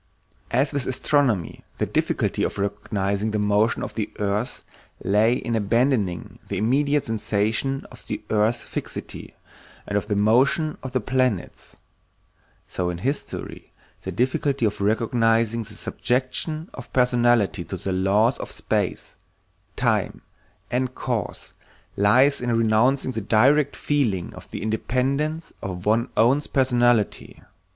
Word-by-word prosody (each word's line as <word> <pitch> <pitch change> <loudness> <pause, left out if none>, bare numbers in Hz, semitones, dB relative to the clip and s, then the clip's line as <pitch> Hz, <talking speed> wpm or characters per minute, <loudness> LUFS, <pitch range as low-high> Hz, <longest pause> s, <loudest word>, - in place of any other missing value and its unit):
As 135 +5 +1
with 140 -3 -2
astronomy 130 - 0
the - - 0
difficulty - - -1
of - - -1
recognizing 100 +1 -1
the 105 - -1
motion 105 +2 +2
of - - -5
the 105 -1 -3
earth 105 +3 -2 0.4
lay 105 +5 +3
in 120 -2 -2
abandoning 110 -4 0
the 100 - -3
immediate 140 +7 +2
sensation 110 +5 -1
of - - -14
the - - -4
earth's 110 +3 +2
fixity - - -7 0.5
and 100 - -4
of 105 - -10
the 105 - 0
motion 130 +9 +2
of 130 0 -7
the 130 - +1
planets, 125 -4 -1 0.9
so 90 -1 -2
in 85 - -3
history 135 +11 -4 0.3
the 95 - -5
difficulty 130 - 0
of 105 -1 -1
recognizing 115 +1 +2
the 110 - -10
subjection 135 +6 -1
of 135 - -10
personality 120 -6 +3
to 95 - -5
the 95 +2 -3
laws 100 +6 +2
of - - -5
space, - - -2 0.6
time, - - 0 0.5
and 125 +1 -1
cause 115 -7 -4 0.4
lies 130 +8 +4
in 120 -2 +1
renouncing 115 +4 +2
the 115 - -3
direct 135 +8 +3
feeling 115 - -1
of - - -12
the - - -6
independence 135 +8 -1
of 90 -2 -5
one's 115 +3 +2
own 125 +6 +4
personality. 120 -5 +1
115 Hz, 130 wpm, -24 LUFS, 105-130 Hz, 0.9 s, lies